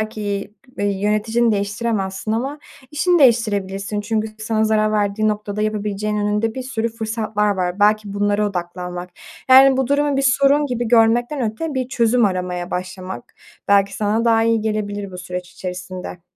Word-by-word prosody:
belki, 205 -2 -4 0.2
iii, 200 -1 -1
yöneticini 220 +3 +1
değiştiremezsin 205 -1 -2
ama 270 +6 -2 0.3
işini 345 +4 +2
değiştirebilirsin 205 -5 +1
çünkü 220 +1 -1
sana 220 0 0
zarar 215 0 +2
verdiği 210 +1 +1
noktada 210 0 -2
yapabileceğin 210 0 -2
önünde 210 +2 0
bir 260 - -4
sürü 230 -3 -2
fırsatlar 220 -2 -2
var, 180 +2 -2
belki 210 -1 +3
bunlara 205 +1 +1
odaklanmak... 180 -1 -5 0.4
Yani, 265 +1 +8
bu 265 -1 +1
durumu 285 0 +1
bir 275 - +1
sorun 275 +2 +3
gibi 240 -3 -2
görmekten 240 +4 +3
öte 305 +5 -5
bir 255 -1 -2
çözüm 235 -2 +2
aramaya 180 -2 -2
başlamak 185 -6 -6 0.3
belki 200 -1 +3
sana 215 +2 0
daha 225 -1 +4
iyi 230 -1 +2
gelebilir 205 -2 -3
bu 180 - -9
süreç 180 0 -6
içerisinde. 180 -1 -7
215 Hz, 150 wpm, -20 LUFS, 200-230 Hz, 0.4 s, Yani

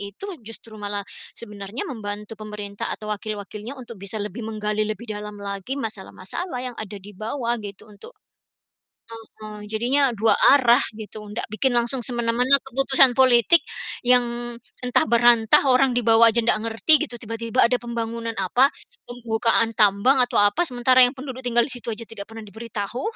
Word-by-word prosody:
itu, 200 - -8 0.2
justru 225 0 -10
malah 205 0 -3 0.3
sebenarnya 210 +1 -7
membantu 210 -4 -6
pemerintah 210 -1 -6
atau 215 0 -5
wakil-wakilnya 210 +4 -7
untuk 235 -5 -11
bisa 200 +2 -3
lebih 210 +2 -5
menggali 215 -1 -2
lebih 215 +2 -5
dalam 210 -2 -7
lagi 200 +5 -5
masalah-masalah 225 - -5
yang 250 -2 -5
ada 210 -1 -7
di 200 +1 -12
bawah 235 +4 -3
gitu, 200 -1 -9
untuk 210 - -14 1.3
mhm, 210 -1 -9
jadinya 255 +5 +2
2 220 +1 +3 0.2
arah 245 -3 +4
gitu, 215 0 -9
ndak 220 - -4
bikin 260 +5 +1
langsung 240 +2 +1
semena-mena 240 +2 +3
keputusan 270 0 +4
politik 260 +4 +5 0.5
yang 240 -1 +1 0.3
entah 250 0 +3
berantah, 235 +1 +5
orang 255 +1 +4
di - - +3
bawah 230 0 +6
aja 235 - +2
ndak 225 - +3
ngerti 230 +7 +2
gitu, 245 - -8
tiba-tiba 230 +2 -1
ada 250 - +1
pembangunan 230 -1 -4
apa, 240 +8 +3 0.4
pembukaan 230 -1 0
tambang 210 +6 +4
atau 245 0 -4
apa, 205 +11 +2
sementara 255 0 +2
yang 245 - +4
penduduk 260 -1 -7
tinggal 240 -1 +2
di - - -6
situ 245 -1 -7
aja 230 - -7
tidak 210 -3 -8
pernah 225 0 -10
diberitahu, 220 +2 -6
230 Hz, 160 wpm, -23 LUFS, 210-245 Hz, 1.3 s, bawah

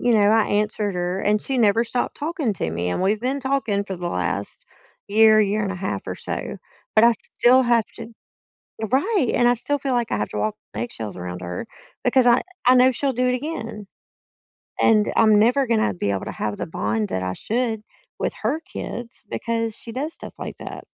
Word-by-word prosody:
you 245 - +2
know, 205 0 +5
I 220 0 +4
answered 210 -1 0
her, 180 +1 -1
and 210 +1 +2
she 265 +3 -2
never 225 +1 +4
stopped 245 +2 -2
talking 305 - -1
to 80 - -2
me. 85 +2 -2
And 90 - -1
we've 210 +3 +1
been 265 +3 -1
talking 240 -7 0
for 190 -2 -5
the 175 0 -3
last 95 - -3 0.4
year, 215 +1 +6
year 210 +1 +1
and 195 - -1
a - - -5
half 190 +1 -4
or - - -3
so, - - -5 0.4
but 215 - +6
I 235 - +7
still 255 +2 +4
have 235 -3 +3
to 230 -1 -8 0.8
Right, 310 - +2
and 240 - +4
I 245 - +4
still 285 +5 -1
feel 270 -1 -1
like 240 -2 0
I - - +1
have 105 - -2
to 105 - -5
walk 105 +1 0 0.2
on 110 - -2
eggshells 110 -3 -6
around 90 0 -6
her 90 0 -5 0.4
because 260 -2 +4
I 240 +1 +5 0.2
I 255 - +7
know 255 +1 +6
she'll 275 +2 0
do 250 0 0
it 250 - +2
again. 230 -7 -5 0.9
And 215 -2 +4
I'm 215 -2 +6
never 250 +6 +3
gonna 220 - +2
be 100 +3 -2
able 95 -1 -2
to - - -5
have 105 -1 -3
the - - -3
bond 105 -7 -1
that 95 0 -2
I 95 0 -2
should 225 -2 -1 0.4
with - - -1
her 245 +8 +1
kids 240 -7 -7
because 230 -1 -2
she 230 - -9
does 295 +7 -3
stuff - - -9
like - - -6
that. - - -8
220 Hz, 215 wpm, -23 LUFS, 180-250 Hz, 0.9 s, I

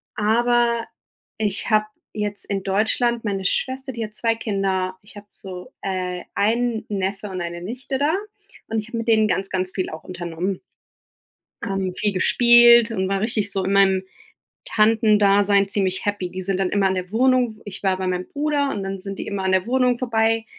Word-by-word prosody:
aber 235 +2 +2 0.5
ich 205 -1 -1
habe 215 -1 +3 0.3
jetzt 205 -1 -3
in 200 -1 -2
Deutschland 225 +4 +1
meine 195 -2 -2
Schwester, 265 +6 -1
die 230 -1 -4
hat 210 0 -13
zwei 230 0 +1
Kinder. 195 -4 -1
Ich 205 - -15
habe 205 - -11
so, 190 +3 -8
äh, 185 -2 -3
einen 225 +1 0
Neffe 195 +1 -3
und 185 -2 -5
eine 170 0 -5
Nichte 255 +8 -4
da 295 +3 +2 0.6
und 225 - -2
ich 215 +1 -8
habe 230 - -4
mit 230 - -5
denen 220 -1 +4
ganz, 195 -1 -1
ganz 185 -1 -2
viel 185 - -3
auch 160 - -8
unternommen. 175 +1 -4 1.0
Ähm, 195 -1 -2
viel 210 -1 0
gespielt 235 +3 +6
und 190 -3 -1
war 195 0 0
richtig 215 -1 0
so 195 -1 -1
in 195 +1 0
meinem 190 -1 +4 0.6
Tantendasein 205 -2 +4
ziemlich 190 -1 -1
happy. 205 -3 -2
Die 185 +1 -5
sind 190 0 -1
dann 190 -1 +1
immer 200 0 +2
in 190 - 0
der 185 0 -5
Wohnung 245 -1 +2
ich 200 -1 -8
war 190 -1 +2
bei 190 0 -3
meinem 180 0 -2
Bruder 290 -1 0
und 205 -7 -3
dann 195 0 -5
sind 195 0 -7
die - - -5
immer 200 -1 -3
an 190 - +1
der 185 +2 +1
Wohnung 250 -1 +2
vorbei 225 -2 +1
205 Hz, 190 wpm, -22 LUFS, 190-230 Hz, 1.0 s, gespielt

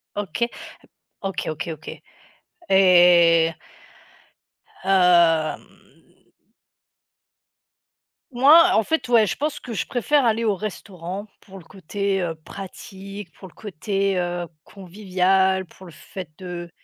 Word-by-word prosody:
OK, 205 +4 -2 0.7
OK, 195 -1 -4
OK, 155 +2 -5
OK 155 - -10 0.7
et 175 -3 +5 1.3
hem 175 -4 +3 2.7
moi, 290 +7 +6
en 220 - +3
fait, 320 +4 -1
ouais, 235 -3 +4
je 175 - -3
pense 295 0 -3
que 245 - -9
je 210 - -3
préfère 280 +2 +1
aller 230 0 +1
au 215 -3 +2
restaurant 195 -1 -7
pour 195 -1 -14
le - - -15
côté, 195 +2 -3
heu, 165 -2 -3
pratique, 195 +3 -10
pour 190 - -13
le 180 - -19
côté, 195 0 -2
heu, 175 0 -3 0.2
convivial, 190 0 0
pour 185 +2 -17
le 170 - -13
fait 185 +4 -10
de 175 -2 -7
190 Hz, 115 wpm, -22 LUFS, 175-205 Hz, 2.7 s, moi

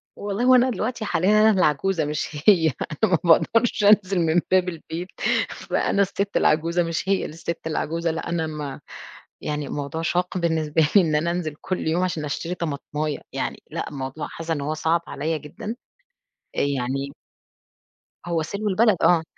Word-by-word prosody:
والله 205 +3 -3
هو 255 0 +7
أنا 255 +1 +5
دلوقتي 240 -1 -2
حاليًا 205 +3 +3
أنا 220 - +6
اللي 190 -6 +3
عجوزة 160 +3 +1
مش 150 0 -2 0.2
هي، 175 -6 +6 0.4
أنا - - +4
ما 180 - +5 0.2
بأقدرش 230 -2 0
أنزل 200 -2 +5
من 165 +1 +3
باب 185 -1 +4
البيت، 165 +1 -6 0.4
فأنا 200 - 0
الست 200 +1 0
العجوزة 165 +3 +2
مش 165 +3 -3
هي - - +5
اللي - - -7
الست 165 +1 -4
العجوزة، 165 +1 -1
لأ 165 0 -4
أنا 165 -2 -1
ما 150 -2 -5 0.6
يعني 150 -1 -3
موضوع 145 +3 -4
شاق 180 +2 -1
بالنسبة 160 -2 +1
لي 200 - +9
إن 155 -3 +1
أنا 170 +3 +1
أنزل 165 -4 -3
كلّ 185 -4 -3
يوم 170 +3 +1
عشان 170 -4 -2
أشتري 165 +4 -3
طماطماية، 150 -2 -3
يعني - - -3
لأن - - -3
الموضوع 135 +2 -5
حاسّة 165 0 -4
إن 145 - -3
هو 150 +2 -2
صعب 160 +2 +1
عليَّ 155 +2 -2
جدًا، 210 +10 -7 0.8
آآ، - - 0
يعني 135 0 -1 1.2
هو 170 -2 0
سلو 200 +6 -3
البلد 210 0 +3
آه، 170 -2 +4
165 Hz, 175 wpm, -23 LUFS, 155-190 Hz, 1.2 s, لي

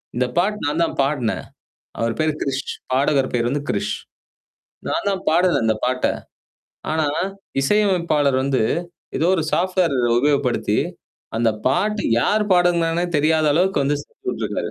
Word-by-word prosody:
இந்த 125 +1 +1
பாட்டு 205 +4 +1
நான் 150 +3 0
தான் 165 - -2
பாடுனேன். 135 -5 -1 0.6
அவர் 115 0 0
பேரு 155 0 +2
கிரிஷ் 135 -1 -1 0.3
பாடகர் 135 0 +2
பேரு 120 -1 +1
வந்து 140 +2 -2
கிரிஷ். 100 - -1 1.0
நான் - - -1
தான் 195 -1 -2
பாடுனேன் 170 -6 +3
இந்த 110 -1 +2
பாட்ட, 125 0 0 0.9
ஆனா, 160 -1 +1 0.5
இசையமைப்பாளர் 170 -5 +2
வந்து 135 -3 +1 0.5
ஏதோ 160 - +1
ஒரு 165 - 0
சாஃப்ட்வேர் 180 -3 +1 0.2
உபயோகப்படுத்தி, 140 -2 +1 0.6
அந்த 115 0 +3 0.2
பாட்டு 205 +10 +1 0.2
யார் 210 - +2
பாடுனாங்கன்னே 175 -1 +2
தெரியாத 155 +1 +2
அளவுக்கு 180 0 +2
வந்து 145 +2 +1
செஞ்சு - - -25
விட்டுருக்காரு. - - -3
150 Hz, 135 wpm, -21 LUFS, 135-175 Hz, 1.0 s, பாடுனேன்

